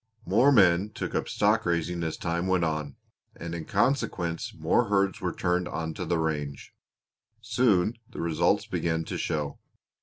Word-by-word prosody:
"More 120 +10 +4
men 95 -4 +5
took - - -5
up - - -1
stock 105 +2 +2
raising 85 0 -1
as 80 -1 -3
time 85 +1 -2
went 95 -2 +2
on, 75 -3 -2 0.4
and 85 0 -6
in 80 -2 -5
consequence 100 -7 0
more 120 - +1
herds 100 -2 +1
were 90 -2 -1
turned 90 0 0
onto 80 +3 -4
the 85 0 0
range. 75 -3 -3 0.7
Soon 110 -3 +2 0.2
the - - -9
results 85 -2 +1
began 80 -1 -1
to - - -4
show. 75 -2 -2
85 Hz, 155 wpm, -27 LUFS, 80-100 Hz, 0.7 s, men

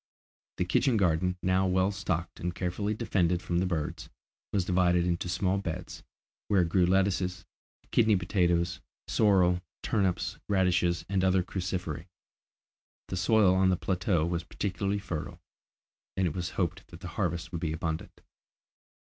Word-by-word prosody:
The 90 - 0
kitchen 115 +7 +2
garden, 90 -1 +1
now 95 +1 +2
well 95 +1 +2
stocked 90 -3 -3
and 85 0 -3
carefully 100 +4 -2
defended 90 -6 +1
from 85 -1 -1
the 95 - +1
birds, 80 -5 -3 0.4
was 95 -3 +1
divided 90 -1 +3
into 90 0 -1
small 95 +2 +1
beds, 90 -2 -5 0.5
where 100 -3 +4
grew 90 +1 +2
lettuces, 95 -1 +1 0.5
kidney 110 -2 +4
potatoes, 85 -2 +1 0.3
sorrel, 90 -4 +3 0.2
turnips, 95 -4 0
radishes, 90 -3 +2
and 95 -1 0
other 95 -1 +3
cruciferæ. 90 -3 -4 1.0
The 95 - -3
soil 95 +1 +4
on 95 0 +3
the 90 - +2
plateau 90 -3 0
was 85 0 -2
particularly 100 +2 -2
fertile, 90 -6 -5 0.8
and 95 - +2
it 85 - 0
was 90 -1 -3
hoped 90 +1 -1
that 85 +1 -13
the 90 - -6
harvests 85 -2 -2
would 85 -2 -4
be 80 -3 -1
abundant. 80 0 -4
90 Hz, 145 wpm, -29 LUFS, 85-95 Hz, 1.0 s, where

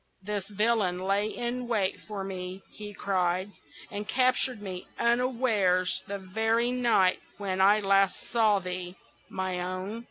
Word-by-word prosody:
"This 205 -1 -3
villain 210 -3 +1
lay 200 +2 +1
in 240 +2 -3
wait 210 -5 0
for 205 -3 -4
me," 185 0 -6
he 210 -1 -8
cried, 185 -1 0 0.4
"and 205 0 -5
captured 255 -2 +2
me 185 -3 -7
unawares 235 -7 +2
the 200 - -3
very 225 +5 +1
night 235 -7 +3 0.2
when 190 -2 -2
last 195 -1 +4
I - - -15
saw 220 -3 +4
thee, 180 -1 -5 0.3
my 185 -1 -2
own. 185 +4 -4
200 Hz, 135 wpm, -28 LUFS, 185-225 Hz, 0.4 s, last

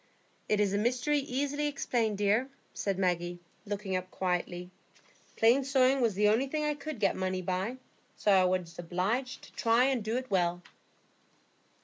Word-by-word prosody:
"It 210 - +2
is 200 -2 +2
a 200 - +1
mystery 250 +6 +1
easily 285 +2 -1
explained, 235 -7 -1
dear," 210 +6 +2 0.2
said 195 -2 -2
Maggie, 175 -2 0 0.3
looking 200 -2 -3
up 185 0 -3
quietly. 180 -1 -2 0.6
"Plain 240 +5 +4
sewing 265 0 +3
was 225 -5 +2
the 210 +1 +3
only 225 +6 +3
thing 300 +2 -2
I 300 0 +1
could 290 -3 -7
get 200 - +2
money 185 0 -2
by, 190 +7 -2 0.4
so 210 - +2
I 190 -2 +5
was 180 -2 -1
obliged 200 +10 -2
to - - -14
try 230 +1 +3
and 260 -4 +1
do 220 +3 -1
it 255 -2 -5
well." 175 -2 +1
210 Hz, 165 wpm, -30 LUFS, 185-255 Hz, 0.6 s, I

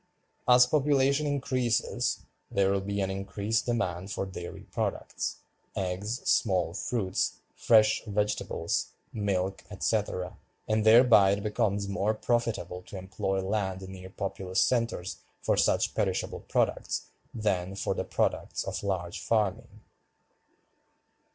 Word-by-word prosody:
As 125 0 +8
population 140 +1 +2
increases 130 -5 0 0.2
there 100 -1 +2
will 100 0 +1
be 100 +1 -2
an 95 0 0
increased 100 +4 -1
demand 95 -6 -1
for 100 - -2
dairy 90 -2 -8
products, - - -3 0.3
eggs, 95 +5 -3
small 90 -5 +2
fruits, 100 -1 -1 0.2
fresh 110 -1 +4
vegetables, 105 0 -1 0.2
milk, 95 -3 -1
etc., 100 -3 -1 0.3
and 110 0 +2
thereby 110 -4 +7
it 100 0 -3
becomes 105 -2 0
more 100 +2 0
profitable 115 -5 -1
to 100 - -7
employ 95 0 -2
land 95 -2 -2
near 95 0 -9
populous 95 -1 -3
centers 115 -7 +1 0.2
for - - +1
such - - +2
perishable - - -1
products - - -1 0.2
than 95 -4 -1
for 95 - -1
the - - -2
products - - -1
of - - -4
large 95 -4 -2
farming. 105 -4 -1
100 Hz, 120 wpm, -29 LUFS, 95-115 Hz, 0.3 s, As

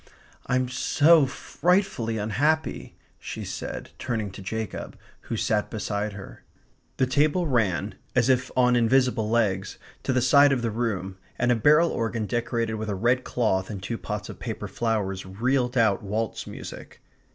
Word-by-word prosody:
"I'm 130 0 +1
so 150 +4 +4
frightfully 165 - 0
unhappy!" 135 +10 0 0.2
she - - -6
said, - - -6
turning 110 -5 -2
to 95 - -10
Jacob, 110 +2 -5 0.3
who 115 - -1
sat 105 0 0
beside 105 -1 -3
her. 100 -1 -10 0.6
The 130 - +3
table 145 +7 +2
ran, 105 - 0 0.2
as 125 -1 +3
if 130 -1 +2
on 125 -1 +4
invisible 120 -2 +2
legs, 100 -5 0 0.2
to - - -1
the 130 - +2
side 140 +3 +6
of 130 -3 0
the 115 - 0
room, 95 -5 -3 0.2
and 120 0 +2
a - - +4
barrel 150 +8 +4
organ 115 -1 -2
decorated 115 0 -1
with 110 0 -4
a 100 - -1
red 120 +6 +2
cloth 95 -6 0
and 105 -3 -5
two 115 - -3
pots 105 0 -4
of - - -9
paper 110 -3 -5
flowers 95 -2 -1
reeled 125 +6 0
out 110 -4 +3
waltz 110 +2 -3
music. - - -9
115 Hz, 160 wpm, -26 LUFS, 105-130 Hz, 0.6 s, side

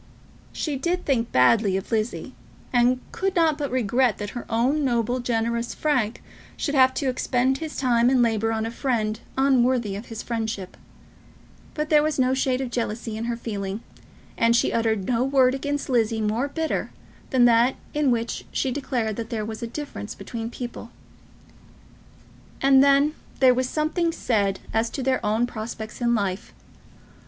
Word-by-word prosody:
She 295 -4 -3
did 350 +6 -1
think 235 -5 0
badly 190 - +4
of 195 - -7
Lizzie, 220 +1 -2 0.4
and 245 +1 +3
could 385 +1 -2
not 325 -3 +3
but 285 -2 -3
regret 245 -1 +1
that 205 -1 -5
her 240 - -7
own 255 +7 +1
noble, 245 -1 0
generous 235 -1 -1
Frank 255 -8 0 0.3
should 290 - -2
have 260 -2 +5
to 275 - -1
expend 260 +1 +1
his 315 -1 -6
time 240 -2 +3
and 255 -2 +4
labour 225 -1 +1
on 220 0 -1
a 225 - -3
friend 225 -4 -1 0.2
unworthy 255 -5 +2
of 205 +4 -7
his 225 -1 -6
friendship; 220 -5 -4 1.0
but 300 0 -3
there 300 -1 +6
was 310 0 0
no 260 -1 +3
shade 265 -1 0
of 255 -2 -4
jealousy 230 -2 -3
in 225 +1 -4
her 235 0 -2
feeling, 205 -2 -4 0.6
and 230 0 +4
she 240 - +2
uttered 220 -4 0
no 245 +1 +1
word 260 -1 +3
against 285 +1 -2
Lizzie 225 -3 +1
more 220 +5 0
bitter 320 +3 -2 0.4
than 255 -3 +4
that 240 +2 +4 0.2
in 295 -2 +2
which 235 -1 -1
she 265 - -1
declared 245 -5 -2
that 230 -1 -5
there 220 -2 -3
was 220 +2 -6
a 235 - -3
difference 275 -4 -6
between 230 -1 -6
people. 240 -1 -7 1.7
And 270 0 +6
then 280 +2 +4 0.3
there 260 -1 +6
was 255 0 -1
something 320 +2 0
said 200 - 0
as 225 +1 +1
to 270 - -4
their 260 0 +1
own 215 +3 +2
prospects 220 -1 -7
in 235 0 +2
life. 195 -3 -3
240 Hz, 170 wpm, -24 LUFS, 225-265 Hz, 1.7 s, there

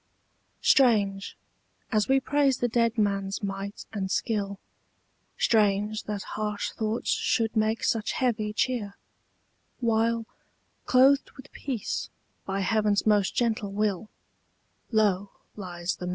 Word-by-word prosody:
Strange, 205 -7 +3 0.5
as 215 -2 +2
we 270 0 +4
praise 275 -1 +2
the 245 - 0
dead 230 0 +1
man's 200 -1 0
might 195 +1 -5
and 195 -3 -2
skill, 200 -2 -1 0.8
Strange 210 -1 +2
that 205 -2 -4
harsh 210 -1 -2
thoughts 220 +1 -2
should 225 -1 +1
make 220 +1 +1
such 225 -1 0
heavy 220 -4 0
cheer, 210 -2 -1 0.8
While, 230 -1 +1 0.6
clothed 270 +2 +5
with 265 - -13
peace 255 -7 -4 0.4
by 195 0 -1
heaven's 210 +1 +1
most 210 -2 +2
gentle 220 -4 0
will, 210 0 -1 0.8
Low 205 -3 +2 0.3
lies 175 -3 -4
the 180 - -5
mere. - - -2
215 Hz, 120 wpm, -27 LUFS, 200-230 Hz, 0.8 s, clothed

